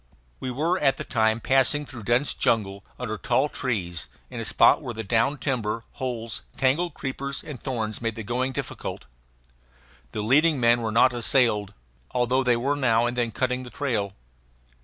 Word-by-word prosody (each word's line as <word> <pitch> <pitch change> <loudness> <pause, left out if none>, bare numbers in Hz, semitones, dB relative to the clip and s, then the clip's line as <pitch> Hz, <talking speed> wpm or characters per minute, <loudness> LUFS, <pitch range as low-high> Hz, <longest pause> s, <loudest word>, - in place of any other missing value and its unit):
We 130 - -4
were 160 +9 0
at 135 -2 +3
the - - -4
time 110 -2 +1
passing 135 +4 +3
through 120 -7 -9
dense 120 +5 +2
jungle, 100 -3 0
under 110 -4 -4
tall 130 +4 +1
trees, 90 - -2 0.2
in - - -5
a - - -4
spot - - +5
where 120 - -6
the 110 - -4
down 115 +7 +1
timber, 115 -5 -2
holes, 115 -4 -4 0.2
tangled 150 +7 +1
creepers, 135 +1 -4
and 145 -6 -8
thorns 115 -5 -3
made 115 -1 -2
the 115 - -5
going 125 +4 -1
difficult. - - -5 1.1
The 105 - -3
leading 150 +6 +4
men 120 0 +4
were 110 -1 -2
not 120 +3 +5
assailed, 115 -4 +2 0.4
although 125 +1 +2
they 125 -2 +3
were 140 +4 0
now 120 -4 +2
and 120 +1 -1
then 120 -2 0
cutting 125 +2 -1
the 125 - -8
trail. 115 -8 -2
120 Hz, 175 wpm, -25 LUFS, 115-135 Hz, 1.1 s, spot